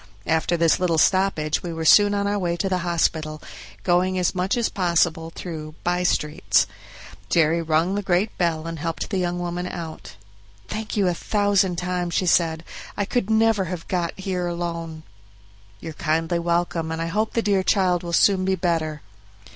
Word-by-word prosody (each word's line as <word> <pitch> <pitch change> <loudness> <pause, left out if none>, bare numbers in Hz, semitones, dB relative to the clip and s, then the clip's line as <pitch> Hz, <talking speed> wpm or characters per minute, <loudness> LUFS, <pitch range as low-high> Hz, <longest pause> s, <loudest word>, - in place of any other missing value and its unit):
After 160 +2 +1
this 165 -1 +3
little 175 -3 +1
stoppage 160 -3 +2
we 175 - -5
were 160 -1 -4
soon 205 +4 +6
on 200 0 0
our 205 0 0
way 175 -2 -1
to 195 - -1
the 185 -1 0
hospital, 160 -3 -1 0.4
going 185 +1 +2
as 180 -1 +1
much 185 +5 0
as 235 - +1
possible 170 -3 0
through 155 -3 -7
by 175 0 0
streets. 160 -1 +1 0.6
Jerry 165 0 +3
rung 165 +3 +1
the 205 - -1
great 190 +2 0
bell 165 -3 0
and 165 -1 -5
helped 165 +6 -4
the 195 - 0
young 175 -1 -1
woman 175 0 -3
out. 165 -8 -7 0.5
"Thank 215 0 -5
you 200 -2 +3
a 180 - +2
thousand 200 -1 +1
times," 180 -1 -2
she 185 - +1
said; 165 -2 +2 0.3
"I 205 - 0
could 230 -1 -1
never 220 -3 +3
have 175 -1 -6
got 175 -1 -2
here 185 -2 -2
alone." 170 -2 -4 0.8
"You're 160 +5 -7
kindly 165 +2 0
welcome, 170 -1 -1
and 160 - -3
I 165 - -1
hope 210 +6 -1
the 230 - 0
dear 200 -2 +2
child 185 -2 +2
will 170 - -6
soon 190 +2 +4
be 190 0 +1
better." 165 -4 -1
175 Hz, 180 wpm, -23 LUFS, 165-190 Hz, 0.8 s, soon